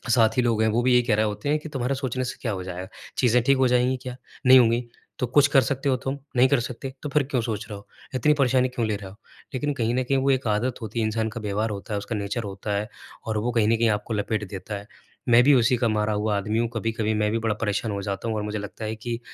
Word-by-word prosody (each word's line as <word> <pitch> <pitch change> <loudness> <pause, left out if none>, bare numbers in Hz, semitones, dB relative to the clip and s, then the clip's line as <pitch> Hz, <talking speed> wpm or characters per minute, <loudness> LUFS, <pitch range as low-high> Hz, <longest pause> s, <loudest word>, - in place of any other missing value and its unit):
साथी 115 0 +4
लोग 115 -3 +1
हैं, 110 - +3
वो 115 +3 +1
भी 130 - +3
यही 125 - +6
कह 115 -3 +2
रहे 110 +1 +2
होते 105 +7 -3
हैं 150 +1 +2
कि, 155 - -9
"तुम्हारा 135 -1 -1
सोचने 130 -1 -2
से 125 - -5
क्या 115 - -1
हो 95 -1 -4
जाएगा? 90 0 -6 0.3
चीज़ें 125 -1 +4
ठीक 135 +2 +3
हो 130 0 +4
जाएँगी 125 +1 +3
क्या? 125 -1 -6 0.3
नहीं 130 0 +9
होंगी। 120 0 +2 0.3
तो 125 - 0
कुछ 145 +4 +5
कर 135 -1 +5
सकते 140 +1 -1
हो 130 - +3
तुम? 135 +2 -4 0.2
नहीं 125 +2 +6
कर 140 - +3
सकते। 125 +3 -6
तो 150 - -3
फिर 145 0 +2
क्यों 125 -4 +1
सोच 110 -1 -3
रहे 105 - -6
हो? 100 - -15 0.3
इतनी 150 +4 +3
परेशानी 130 -1 +3
क्यों 125 -2 -2
ले 105 - 0
रहे 100 -2 -9
हो?" 95 - -14 0.4
लेकिन 145 +3 -1
कहीं 120 -4 -1
न 130 - +1
कहीं 135 +2 +1
वो 135 +1 +2
एक 130 -2 0
आदत 115 +5 -1
होती 110 +1 -4
है, 110 - +1
इंसान 110 0 -1
का 115 +1 -7
व्यवहार 105 +2 -1
होता 100 +1 -6
है, - - 0
उसका 105 +3 -5
नेचर 105 +3 -3
होता 100 +1 -4
है, 105 +1 -3 0.4
और 110 -1 -1
वो 115 +4 0
कहीं 110 -3 +2
न 115 - +3
कहीं 115 0 +3
आपको 105 +2 -1
लपेट 105 0 -1
देता 100 +2 -6
है। 100 +1 -11 0.4
मैं 120 +1 +7
भी 145 - +6
उसी 120 +1 +3
का 120 0 +1
मारा 105 0 0
हुआ 105 0 0
आदमी 105 +3 -1
हूँ। 120 - +1
कभी-कभी 115 -1 -1
मैं 105 - +1
भी 115 - 0
बड़ा 105 - +1
परेशान 110 0 -1
हो 100 -1 -3
जाता 100 +2 -3
हूँ 110 - -1
और 105 - -2
मुझे 105 0 -3
लगता 105 +2 -7
है 110 +1 -3
कि 115 +1 -4
115 Hz, 290 wpm, -25 LUFS, 105-125 Hz, 0.4 s, नहीं